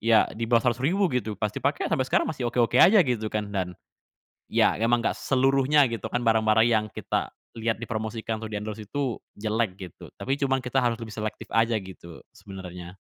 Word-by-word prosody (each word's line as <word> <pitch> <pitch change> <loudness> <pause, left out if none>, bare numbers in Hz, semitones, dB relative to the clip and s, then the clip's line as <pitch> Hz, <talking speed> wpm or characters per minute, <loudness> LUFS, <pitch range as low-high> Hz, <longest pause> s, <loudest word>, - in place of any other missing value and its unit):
ya 115 0 +5
di 115 - -6
bawah 115 -1 +4
Rp.100.000 135 - +2
gitu. 110 -4 -1
Pas 105 -1 0
dipakai, 140 +5 -1
sampai 130 - +2
sekarang - - +2
masih 130 -6 -2
oke-oke 120 -2 +2
aja, 195 -1 +7
gitu 115 -5 -1
kan. 105 -1 -3
Dan, 90 -3 -3 0.8
ya - - +3
emang 115 +2 +2
nggak - - +1
seluruhnya, 135 +2 +3
gitu 115 -1 -5
kan, 120 - 0
barang-barang 110 0 +4
yang 110 -2 +2
kita - - -2 0.3
lihat 115 0 -1
dipromosikan 110 -1 -4
atau 110 - -6
di-endorse 105 +1 -5
itu 135 -2 -2 0.2
jelek, 110 -2 -1
gitu. 95 -4 -10
Tapi 135 +2 -2
cuman 135 -1 +2
kita 125 +2 0
harus 120 -2 +1
lebih 110 -2 -7
selektif 110 +1 -5
aja, 115 0 +3
gitu, 95 -4 -10
sebenarnya. 90 -2 -10
115 Hz, 185 wpm, -26 LUFS, 105-125 Hz, 0.8 s, aja